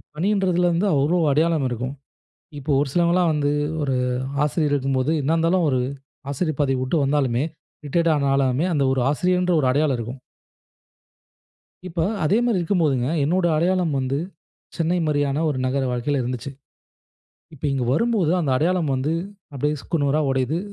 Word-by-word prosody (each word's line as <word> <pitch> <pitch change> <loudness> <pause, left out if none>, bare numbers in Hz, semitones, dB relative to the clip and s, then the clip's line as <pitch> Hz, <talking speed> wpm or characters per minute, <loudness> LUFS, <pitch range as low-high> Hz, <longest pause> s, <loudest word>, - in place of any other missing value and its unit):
பணின்றதிலேருந்து 180 0 +1
அவ்ளோ 145 +6 +2
அடையாளம் 155 -1 +2
இருக்கும். 125 +3 -4 0.7
இப்போ, 145 +2 -5
ஒரு 145 - 0
சிலவங்கலாம் 175 +1 +2
வந்து 145 -1 0 0.3
ஒரு 135 -2 0 0.5
ஆசிரியர் 150 -1 0
இருக்கும்போது, 135 +2 0
என்னா 150 +4 +1
இருந்தாலும் 165 +1 +2
ஒரு 130 - +1 0.5
ஆசிரியர் 155 +1 -2
பதவி 135 -1 +1
விட்டு 130 +6 -1
வந்தாலுமே 135 -3 +1 0.4
ரிட்டயர்ட் 165 +2 +2
ஆனாலுமே, 135 0 +1
அந்த 145 - +1
ஒரு 135 - 0
ஆசிரியர் 180 +5 +1
என்ற 180 -1 +1
ஒரு 135 - 0
அடையாளம் 140 0 +1
இருக்கும். 120 +3 -6 1.7
இப்ப, 170 -1 -4 0.2
அதே 160 +7 +3
மாரி 230 -6 +1
இருக்கும்போதுங்க, 160 -8 +1 0.2
என்னுடைய 175 +3 +1
அடையாளம் 175 -1 +1
வந்து, 135 +1 -1 0.6
சென்னை 170 +2 0
மாரியான 145 0 0
ஒரு 145 -4 -1
நகர 135 +2 0
வாழ்க்கையில 130 +3 -1
இருந்துச்சு. 125 +2 -4 1.0
இப்ப 150 - -16
இங்கு 135 -3 -1
வரும்போது 205 -3 +1
அந்த 150 -6 0
அடையாளம் 165 +1 +1
வந்து, 135 +5 -1 0.4
அப்டியே 150 +3 -1
சுக்குநூறா 150 -2 0
உடையுது. 130 +5 0
150 Hz, 140 wpm, -22 LUFS, 135-170 Hz, 1.7 s, அதே